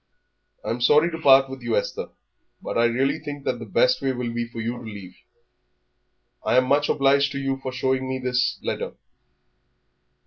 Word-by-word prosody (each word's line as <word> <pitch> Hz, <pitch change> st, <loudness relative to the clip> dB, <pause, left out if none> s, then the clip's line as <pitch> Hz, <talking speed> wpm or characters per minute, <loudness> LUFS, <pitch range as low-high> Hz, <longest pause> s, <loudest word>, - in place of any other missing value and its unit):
"I'm 120 Hz, +1 st, -3 dB
sorry 150 Hz, +7 st, +4 dB
to 165 Hz, -, -5 dB
part 135 Hz, -2 st, +6 dB
with 135 Hz, -1 st, -9 dB
you, 120 Hz, -1 st, -1 dB
Esther, 100 Hz, -, -3 dB, 0.5 s
but -, -, -6 dB
I 115 Hz, -, +3 dB
really 130 Hz, +4 st, +1 dB
think 145 Hz, -2 st, -7 dB
that -, -, -1 dB
the 115 Hz, -, -8 dB
best 125 Hz, +5 st, +2 dB
way 135 Hz, -1 st, 0 dB
will 120 Hz, -2 st, -4 dB
be 120 Hz, 0 st, -2 dB
for 115 Hz, 0 st, -9 dB
you 115 Hz, +2 st, -3 dB
to 120 Hz, -, -10 dB
leave. 100 Hz, -5 st, -9 dB, 1.3 s
I 125 Hz, -, +2 dB
am 130 Hz, -, +5 dB
much 145 Hz, +2 st, +2 dB
obliged 140 Hz, 0 st, +3 dB
to -, -, -4 dB
you 135 Hz, 0 st, -1 dB
for 135 Hz, -1 st, -6 dB
showing 130 Hz, 0 st, -1 dB
me 130 Hz, -, -2 dB
this 125 Hz, -1 st, 0 dB
letter. -, -, -4 dB
130 Hz, 185 wpm, -24 LUFS, 120-135 Hz, 1.3 s, part